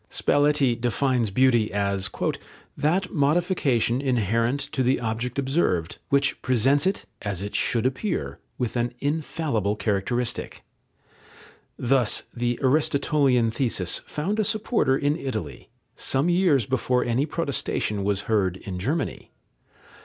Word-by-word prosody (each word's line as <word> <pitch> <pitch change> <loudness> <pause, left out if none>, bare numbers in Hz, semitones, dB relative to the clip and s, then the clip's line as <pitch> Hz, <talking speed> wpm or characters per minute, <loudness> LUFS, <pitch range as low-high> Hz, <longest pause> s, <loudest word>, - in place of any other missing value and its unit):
Spalletti 145 -4 +2
defines 125 -1 +1
beauty 120 0 +3
as 100 -1 -1 0.7
"that 180 +5 0
modification 145 - +1
inherent 115 0 +1
to 140 - -1
the 130 +1 +2
object 115 +2 -3
observed, 130 - 0
which 140 0 +1
presents 130 - +2
it, 195 - -1 0.2
as 100 -3 -3
it 105 - -5
should 115 0 +1
appear, 135 +9 -2 0.2
with 125 -2 -2
an 120 0 -1
infallible 140 - -1
characteristic." 105 +4 -2 1.1
Thus 125 -2 +1
the 120 0 -1
Aristotelian 140 -4 +2
thesis 110 - -1
found 190 +8 -2
a - - +3
supporter 210 - +1
in 145 +1 +1
Italy, 110 - -5 0.3
some 140 +6 0
years 175 - +3
before 125 0 +1
any 125 +5 +1
protestation 140 -10 -2
was 100 0 0
heard 95 -5 0
in 95 -1 -6
Germany. 140 - -2
130 Hz, 120 wpm, -25 LUFS, 110-145 Hz, 1.1 s, beauty